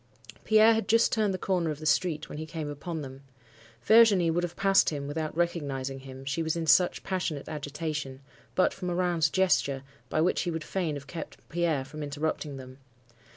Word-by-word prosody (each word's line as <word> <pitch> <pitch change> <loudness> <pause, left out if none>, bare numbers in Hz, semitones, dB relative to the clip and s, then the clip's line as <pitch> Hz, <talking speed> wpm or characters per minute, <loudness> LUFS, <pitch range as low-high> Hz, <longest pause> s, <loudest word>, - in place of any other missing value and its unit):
Pierre 220 +1 +6
had 220 -3 -1
just 230 +1 +4
turned 215 -3 +1
the 185 - -2
corner 180 -3 0
of 150 - -3
the 155 - -9
street, 155 +1 +1
when 150 - -7
he 155 - -5
came 155 -2 -5
upon 155 +2 -5
them. 135 0 -9 0.6
Virginie 210 -6 +6
would 175 +2 +1
have 175 0 -4
passed 195 0 +4
him 145 -2 -4
without 155 +2 -4
recognizing 140 -6 -2
him, 135 0 -10
she 140 +4 -1
was 160 0 -1
in 165 -1 -2
such 175 +4 +4
passionate 180 -6 -3
agitation, 150 -2 -4 0.4
but 185 - +3
for 185 - -8
Morin's 175 -3 +1
gesture, 145 -7 +1 0.3
by - - 0
which 170 +3 +2
he 175 - -2
would 160 -2 -3
fain 165 -2 -2
have 140 -1 -7
kept 160 +2 -9
Pierre 165 -5 0
from 150 +3 -9
interrupting 145 0 -3
them. 130 0 -11
160 Hz, 195 wpm, -28 LUFS, 145-180 Hz, 0.6 s, Pierre